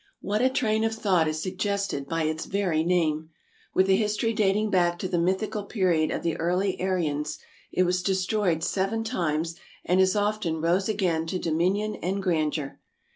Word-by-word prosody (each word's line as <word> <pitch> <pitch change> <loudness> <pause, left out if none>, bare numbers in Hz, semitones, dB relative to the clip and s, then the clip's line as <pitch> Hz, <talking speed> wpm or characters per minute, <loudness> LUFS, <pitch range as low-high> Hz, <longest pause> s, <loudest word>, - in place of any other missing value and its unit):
What 210 +2 -1
a 260 - +4
train 220 -4 +1
of 225 0 0
thought 185 -7 +2
is 155 0 -2
sug 185 0 -5
gested 200 -9 -2
by 165 -1 0
its 155 +1 -2
very 185 -6 0
name! 160 -3 +1 0.5
With 190 - +4
a 190 - +5
history 215 +2 0
dating 210 0 +1
back 175 -2 +2
to 185 - -3
the 175 -2 0
mythical 190 +4 0
period 180 -8 +1
of - - -3
the 165 -2 0
early 180 +3 0
Aryans, 150 -5 -1 0.3
it 185 - +2
was 180 0 +1
destroyed 185 -2 0
seven 200 +5 0
times 165 -5 -1 0.3
and 180 +2 +3
as 190 +1 +3
often 205 -6 0
rose 175 +5 +1
again 175 -6 0
to 185 - -2
dominion 185 +6 0
and 190 +3 -2
grandeur. 155 -5 -1
185 Hz, 180 wpm, -26 LUFS, 165-205 Hz, 0.5 s, a